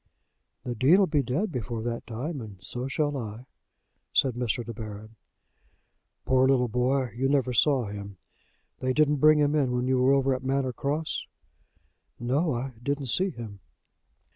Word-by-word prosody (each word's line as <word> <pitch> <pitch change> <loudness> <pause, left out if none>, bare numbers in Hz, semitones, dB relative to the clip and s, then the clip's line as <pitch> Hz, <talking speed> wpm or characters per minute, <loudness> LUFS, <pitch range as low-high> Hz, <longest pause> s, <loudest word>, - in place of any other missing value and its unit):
"The 125 - -3
Dean'll 160 - +5
be 150 -4 +1
dead 150 - -1
before 120 -4 -4
that 115 0 -4
time; 130 +6 -4
and 105 -4 -9
so 125 +7 -5
shall 145 +1 -1
I," 115 -1 -6 0.7
said 130 -2 +3
Mr. 120 -1 -1
De 115 - -6
Baron. 110 0 -8 1.1
"Poor 130 0 +4
little 130 -2 +3
boy! 125 +2 0
You 135 +2 0
never 135 -3 +1
saw 130 0 +3
him. 100 -1 -7 0.6
They 130 0 0
didn't 150 +1 +3
bring 155 +2 +6
him 145 0 +2
in 140 -5 +2
when 125 0 0
you 130 0 +2
were 130 +2 +5
over 135 -1 +3
at 130 0 -4
Manor 130 -1 0
Cross?" 150 +5 -2 0.9
"No; 135 +5 0
I 130 +3 -3
didn't 140 0 -2
see 190 +10 +2
him." 110 - -8
130 Hz, 165 wpm, -27 LUFS, 120-140 Hz, 1.1 s, bring